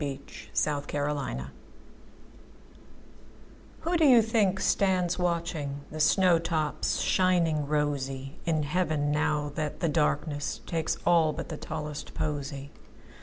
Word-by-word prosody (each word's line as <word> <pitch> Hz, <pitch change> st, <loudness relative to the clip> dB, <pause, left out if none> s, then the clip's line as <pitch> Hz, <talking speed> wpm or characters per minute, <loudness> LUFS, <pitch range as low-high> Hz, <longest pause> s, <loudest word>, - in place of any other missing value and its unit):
30. 140 Hz, -2 st, -3 dB, 0.5 s
Everlasting 145 Hz, -, -2 dB
Flowers 65 Hz, +1 st, -6 dB, 2.3 s
WHO 340 Hz, +2 st, +1 dB
do 325 Hz, -, +4 dB
you 245 Hz, -5 st, +7 dB
think 210 Hz, -4 st, +2 dB
stands 185 Hz, -3 st, +2 dB
watchingThe 160 Hz, -4 st, -2 dB
snow 180 Hz, +1 st, +5 dB
tops 160 Hz, -2 st, -1 dB
shining 170 Hz, -5 st, +2 dB
rosyIn 145 Hz, +1 st, -1 dB
heaven, 150 Hz, -2 st, 0 dB
now 150 Hz, -1 st, 0 dB
that 155 Hz, -1 st, -3 dB
the 170 Hz, -, +1 dB
darknessTakes 150 Hz, +1 st, -1 dB
all 165 Hz, -3 st, +4 dB
but -, -, -6 dB
the 155 Hz, -, -5 dB
tallest 150 Hz, -2 st, -6 dB
posy? 140 Hz, -1 st, -3 dB
155 Hz, 105 wpm, -28 LUFS, 145-175 Hz, 2.3 s, you